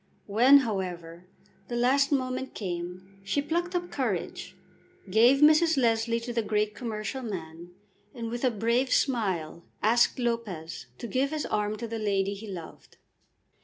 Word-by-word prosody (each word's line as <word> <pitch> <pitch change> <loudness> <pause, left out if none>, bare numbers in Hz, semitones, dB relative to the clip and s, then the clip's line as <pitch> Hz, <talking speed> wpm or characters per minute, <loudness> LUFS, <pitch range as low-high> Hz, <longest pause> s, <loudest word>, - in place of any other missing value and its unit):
When, 250 +7 +6
however, 180 -4 -5 0.4
the 240 - -4
last 265 +4 +3
moment 260 -1 -1
came 185 0 -6
she 200 +8 0
plucked 345 +5 -2
up 350 0 -2
courage, - - -3 0.6
gave 240 +7 +5
Mrs. 310 +1 +5
Leslie 230 -2 +2
to 240 +1 -5
the 230 - +1
great 210 -1 0
commercial 220 +1 -4
man, 170 -6 -7 0.5
and 230 -1 -5
with 240 +2 -4
a 255 - +4
brave 235 +4 0
smile 190 - 0 0.2
asked 235 +5 +4
Lopez 210 - -3
to - - -7
give 260 +4 0
his 310 0 -3
arm 210 0 -1
to 235 +2 -5
the 225 0 -4
lady 200 -2 0
he 210 +2 -9
loved. 175 -5 -10
225 Hz, 150 wpm, -28 LUFS, 195-255 Hz, 0.6 s, When